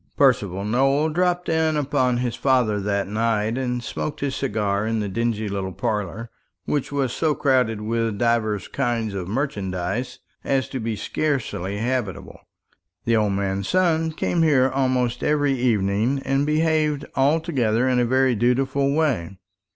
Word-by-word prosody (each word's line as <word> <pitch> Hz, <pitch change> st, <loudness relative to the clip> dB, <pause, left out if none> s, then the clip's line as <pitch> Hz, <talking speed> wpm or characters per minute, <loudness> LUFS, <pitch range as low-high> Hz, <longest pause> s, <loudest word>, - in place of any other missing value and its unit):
Percival 100 Hz, -8 st, +2 dB
Nowell 135 Hz, +7 st, +2 dB
dropped 180 Hz, +2 st, 0 dB
in 160 Hz, -1 st, +1 dB
upon 130 Hz, -4 st, +1 dB
his 120 Hz, -1 st, -1 dB
father 125 Hz, -6 st, +2 dB
that 100 Hz, 0 st, -1 dB
night, 110 Hz, +1 st, 0 dB
and 125 Hz, -2 st, -2 dB
smoked 150 Hz, -, -4 dB
his 140 Hz, -1 st, -1 dB
cigar 105 Hz, -6 st, -1 dB
in 115 Hz, 0 st, 0 dB
the 105 Hz, -, -2 dB
dingy 110 Hz, +1 st, -1 dB
little 95 Hz, -1 st, -3 dB
parlour, 105 Hz, +4 st, -3 dB, 0.3 s
which 145 Hz, -2 st, -1 dB
was 135 Hz, -4 st, -1 dB
so 155 Hz, -3 st, +1 dB
crowded 125 Hz, -6 st, +1 dB
with 115 Hz, -1 st, -1 dB
divers 110 Hz, -4 st, 0 dB
kinds 120 Hz, -5 st, -1 dB
of 95 Hz, -3 st, -4 dB
merchandise 100 Hz, -2 st, -3 dB, 0.3 s
as 135 Hz, -1 st, 0 dB
to 130 Hz, -, -4 dB
be 115 Hz, -1 st, -2 dB
scarcely 105 Hz, -, -2 dB
habitable. 120 Hz, -4 st, -3 dB, 0.7 s
The 115 Hz, -, +2 dB
old 105 Hz, -2 st, +2 dB
man's 95 Hz, 0 st, -2 dB
son 165 Hz, -3 st, +2 dB
came 170 Hz, +2 st, 0 dB
here 135 Hz, -5 st, +4 dB
almost 130 Hz, -3 st, 0 dB
every 145 Hz, -2 st, +2 dB
evening, 120 Hz, +1 st, +1 dB
and 135 Hz, +2 st, +1 dB
behaved 155 Hz, -1 st, +1 dB
altogether 135 Hz, -5 st, +1 dB
in 125 Hz, -1 st, +2 dB
a -, -, +3 dB
very 130 Hz, +1 st, +3 dB
dutiful 130 Hz, +4 st, +1 dB
way. 120 Hz, -, 0 dB
125 Hz, 150 wpm, -23 LUFS, 105-140 Hz, 0.7 s, here